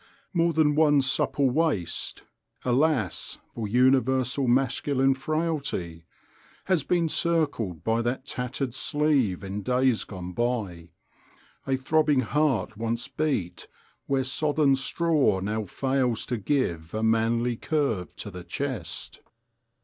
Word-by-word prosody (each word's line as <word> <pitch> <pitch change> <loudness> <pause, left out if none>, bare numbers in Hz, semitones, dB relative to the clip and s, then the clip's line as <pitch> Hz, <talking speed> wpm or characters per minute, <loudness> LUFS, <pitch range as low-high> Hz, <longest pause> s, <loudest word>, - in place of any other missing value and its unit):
More 170 -1 +3
than 155 -2 +3
one 145 -2 +4
supple 135 +1 +2
waist 145 - -1 0.4
(alas! 130 - +1 0.2
for 115 -3 -4
universal 130 +2 +2
masculine 135 +2 +2
frailty!) 140 - -3 0.6
has 185 -7 +2
been 170 +3 +1
circled 150 - 0
by 115 +1 +1
that 120 +3 -2
tattered 125 -1 -3
sleeve 135 - +1
in 100 +1 -4
days 125 +1 +2
gone 90 -2 -7
by; 100 -8 -2 0.8
a 135 -1 +1
throbbing 150 0 +2
heart 130 -5 0
once 115 +2 -2
beat 135 - -2 0.4
where 135 -1 +1
sodden 145 +1 +2
straw 150 - +1
now 105 +3 -2
fails 130 +1 0
to 120 - -2
give 95 - -1
a 110 - -1
manly 115 +2 +2
curve 125 - -1
to 105 - -7
the 90 -1 -8
chest. 110 - -5
130 Hz, 120 wpm, -26 LUFS, 110-145 Hz, 0.8 s, one